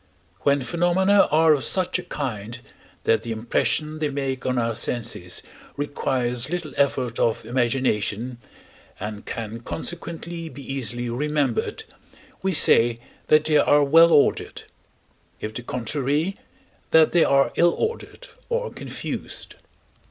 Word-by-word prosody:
When 140 -1 +2
phenomena 180 +6 +3
are 160 +1 +5
of 145 - -1
such 185 -1 +1
a - - -6
kind, 120 - -5 0.5
that 115 - +3
the 115 - -6
impression 150 +7 -1
they 150 -1 0
make 135 -2 -3
on 130 0 0
our 115 -1 0
senses 115 -6 -4 0.3
requires 130 -3 -1
little 170 -5 -4
effort 130 -4 0
of 115 -1 +1
imagination, 120 -1 0 0.6
and 105 0 -6
can 115 0 -5
consequently 165 +4 -6
be 140 0 -10
easily 120 -2 -2
remembered, 140 0 -1 0.6
we 190 - 0
say 120 -7 +4 0.3
that 155 0 +5
they 155 -1 +4
are 145 0 +4
well 165 +4 +6
ordered; 145 - +2 0.8
if 105 0 -5
the 120 - -5
contrary, 140 - -1 0.5
that 160 -1 +5
they 175 - +5
are 140 0 +3
ill 170 0 +4
ordered 460 +2 -4 0.2
or 485 +1 -1
confused. - - -6
140 Hz, 130 wpm, -24 LUFS, 120-160 Hz, 0.8 s, well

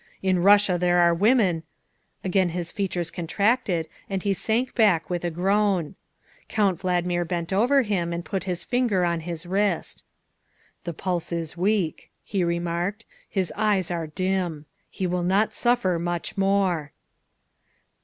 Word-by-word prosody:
In 185 -1 +2
Russia 200 -1 +5
there 175 0 +3
are 170 -1 +5
women 195 -3 +3 0.6
Again 190 -1 +2
his 170 0 -4
features 180 -4 -2
contracted 185 0 0 0.2
and 195 -2 -2
he 200 - +2
sank 230 +6 -1
back 185 -8 +3
with 175 -1 -2
a 175 - 0
groan. 190 -1 +1 0.6
Count 195 -5 +1
Valdmir 175 -1 0
bent 170 +1 -3
over 255 +7 +4
him 185 -6 -1
and 170 0 -4
put 190 +1 -3
his 180 -2 -3
finger 240 -8 +1
on 170 -1 0
his 165 0 -6
wrist. 195 0 -1 0.4
" - - -38
The 170 - -3
pulse 175 +1 -3
is 165 -2 -3
weak," 185 -2 0
he 195 -3 -1
remarked, 170 +5 -2
" - - -32
his 190 -3 -1
eyes 205 -4 +1
are 165 -2 -2
dim. 180 -2 -2 0.2
He 190 - -4
will 180 0 0
not 195 +5 +2
suffer 240 -8 +1
much 175 0 -3
more." 195 -6 +1
180 Hz, 155 wpm, -25 LUFS, 170-200 Hz, 0.6 s, Russia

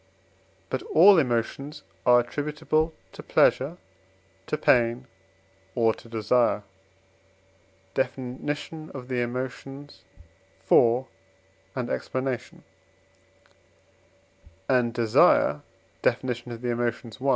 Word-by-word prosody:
But 130 - -1
all 185 +3 +6
emotions 135 +3 -2 0.2
are 120 0 +7
attributable 150 +5 -1 0.2
to - - -10
pleasure, 145 +7 +2 0.7
to 150 - -1
pain, 120 -3 +2 0.7
or 115 -2 +3
to 115 - -15
desire 115 -1 +1 1.3
(Def. 130 - -1
of 135 +2 -6
the 125 -2 -1
Emotions, 130 0 -6 0.7
iv. 120 +2 +5 0.7
explanation); 130 0 -3 2.0
and 125 -2 +2
desire 110 -10 +4 0.4
(Def. - - +1 0.2
of 120 -1 -7
the 120 - -1
Emotions, 120 0 -3
i.) 135 - +1
125 Hz, 85 wpm, -26 LUFS, 120-140 Hz, 2.0 s, are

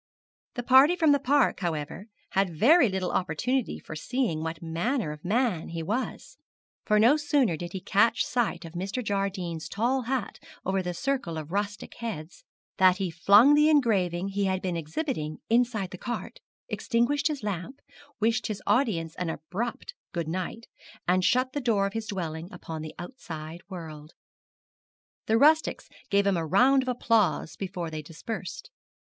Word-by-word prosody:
The 245 - -3
party 265 +7 +6
from 320 -4 +4
the 285 - +4
park, 280 +1 +2
however, 170 +3 -4 0.2
had 195 0 +2
very 280 - +6
little 190 -1 -2
opportunity 220 - -1
for 155 - -9
seeing 220 -2 -1
what 160 0 -4
manner 170 - -1
of 150 0 -10
man 210 -3 0
he 165 -1 -4
was; 220 +10 -4 0.5
for 210 - +2
no 240 +8 +6
sooner 290 - +2
did 175 +2 -7
he 190 - -3
catch 225 +6 +2
sight 240 -8 -1
of 165 - -10
Mr. 195 +8 -3
Jardine's 185 -5 -2
tail 245 +5 0
hat 255 -2 -3 0.3
over 190 0 +1
the 180 -1 -4
circle 255 -9 -2
of 155 0 -7
rustic 205 +1 -3
heads, 180 - -6 0.3
than 185 -1 +6
he 190 -2 -2
flung 205 - +6
the 300 +1 +5
engraving 195 - +2
he 200 0 -1
had 190 -1 0
been 185 -2 -2
exhibiting 160 - -3
inside 230 -5 +2
the 185 - -8
cart, 240 -1 -5 0.3
extinguished 255 +5 +1
his 295 -6 -4
lamp, 205 +6 -4 0.4
wished 225 +1 +1
his 210 -3 -5
audience 200 - +1
an 180 -2 -2
abrupt 185 - -4 0.2
good 170 -3 -2
night, 185 +7 -4 0.4
and 185 +1 +3
shut 255 +5 +2
the 290 - -2
door 220 -6 +2
of 200 - -3
his 225 -1 -4
dwelling 170 -3 -4
upon 165 -3 -7
the 155 0 -8
outside 170 -5 -8
world. 160 -4 -9 1.1
The 220 - +3
rustics 310 +5 +3 0.2
gave 200 0 +3
him 195 -3 +2
a 165 - -1
round 255 - +5
of 260 - -7
applause 220 -10 +1
before 180 -4 -5
they 155 -1 -4
dispersed. 190 - -7
200 Hz, 165 wpm, -27 LUFS, 170-245 Hz, 1.1 s, party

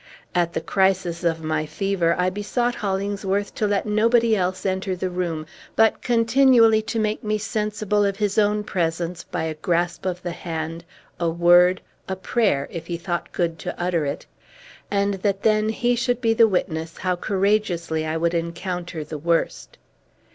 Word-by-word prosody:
At 175 -1 +1
the - - -2
crisis 190 -3 +1
of 165 -1 0
my 155 0 -1
fever 175 +1 0
I 180 +1 +1
besought 225 +5 -1
Hollingsworth 200 -1 -2
to 215 - 0
let 205 -1 0
nobody 225 +2 +3
else 185 0 -1
enter 190 0 -1
the 180 0 -3
room, 170 -3 -2 0.3
but 225 0 +3
continually 230 -1 +4
to 220 +2 -4
make 215 -1 -1
me 215 0 0
sensible 210 -1 -1
of 200 -1 +1
his 205 0 +1
own 210 0 +2
presence 170 -2 -2
by - - -4
a 160 -1 -2
grasp 175 +3 -1
of 180 -1 -3
the 175 - -3
hand, 165 -1 -5 0.4
a 170 -1 +1
word, 175 +2 +5 0.3
a 190 - -1
prayer, 190 - 0
if 165 -1 -7
he 170 - -3
thought 175 0 -4
good 165 -2 -1
to 180 - -6
utter 175 -2 0
it; 140 - -4 0.6
and 200 0 +1
that 200 -1 0
then 215 0 +3
he 240 +2 +1
should 245 0 0
be 230 -2 +2
the 225 0 +6
witness 165 -4 -2
how 185 -1 0
courageously 190 -4 0
I 155 +1 -2
would 170 +1 0
encounter 170 0 -3
the 150 0 -7
worst. 170 +2 -1
185 Hz, 170 wpm, -23 LUFS, 170-210 Hz, 0.6 s, the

